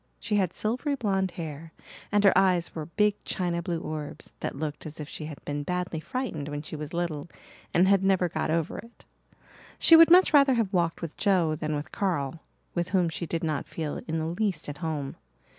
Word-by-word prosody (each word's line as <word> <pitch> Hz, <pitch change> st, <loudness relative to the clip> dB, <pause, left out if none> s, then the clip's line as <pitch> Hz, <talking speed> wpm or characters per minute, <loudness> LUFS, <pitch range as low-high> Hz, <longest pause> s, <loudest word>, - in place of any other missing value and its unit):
She 210 Hz, -, 0 dB
had 185 Hz, -4 st, +1 dB
silvery 250 Hz, +9 st, -1 dB
blonde 195 Hz, -6 st, 0 dB
hair 160 Hz, -1 st, -6 dB, 0.4 s
and 205 Hz, 0 st, +3 dB
her 195 Hz, -, +6 dB
eyes 185 Hz, -2 st, +3 dB
were 155 Hz, -2 st, -5 dB
big 210 Hz, +3 st, +1 dB
china 175 Hz, -2 st, -1 dB
blue 170 Hz, -1 st, -2 dB
orbs 155 Hz, -2 st, -6 dB
that -, -, -3 dB
looked 150 Hz, +1 st, -4 dB
as 155 Hz, +1 st, -8 dB
if 150 Hz, -, -5 dB
she 155 Hz, -, -7 dB
had 150 Hz, -2 st, -9 dB
been 145 Hz, 0 st, -2 dB
badly 180 Hz, +1 st, -2 dB
frightened 195 Hz, -, -4 dB
when 145 Hz, 0 st, -4 dB
she 155 Hz, -, -7 dB
was 150 Hz, 0 st, -6 dB
little 170 Hz, -3 st, -3 dB, 0.4 s
and 180 Hz, +3 st, +4 dB
had 195 Hz, -1 st, +4 dB
never 190 Hz, -2 st, +3 dB
got 165 Hz, -, -2 dB
over 165 Hz, 0 st, -1 dB
it. 230 Hz, +1 st, -14 dB, 0.7 s
She 330 Hz, -, +7 dB
would 330 Hz, 0 st, +9 dB
much 360 Hz, 0 st, +7 dB
rather 275 Hz, -3 st, +6 dB
have 220 Hz, -4 st, 0 dB
walked 170 Hz, -2 st, +1 dB
with 165 Hz, -, -6 dB
Joe 185 Hz, -6 st, +2 dB
than 155 Hz, -1 st, -2 dB
with 145 Hz, +1 st, -5 dB
Carl, 165 Hz, -7 st, -1 dB, 0.3 s
with 175 Hz, 0 st, -1 dB
whom 185 Hz, -3 st, +2 dB
she 165 Hz, +1 st, -4 dB
did 165 Hz, +1 st, -2 dB
not 155 Hz, -3 st, -1 dB
feel 155 Hz, -3 st, -4 dB
in 160 Hz, 0 st, -1 dB
the 160 Hz, -, -1 dB
least 175 Hz, 0 st, -1 dB
at 145 Hz, 0 st, -6 dB
home. 155 Hz, -5 st, -3 dB
170 Hz, 210 wpm, -27 LUFS, 155-195 Hz, 0.7 s, would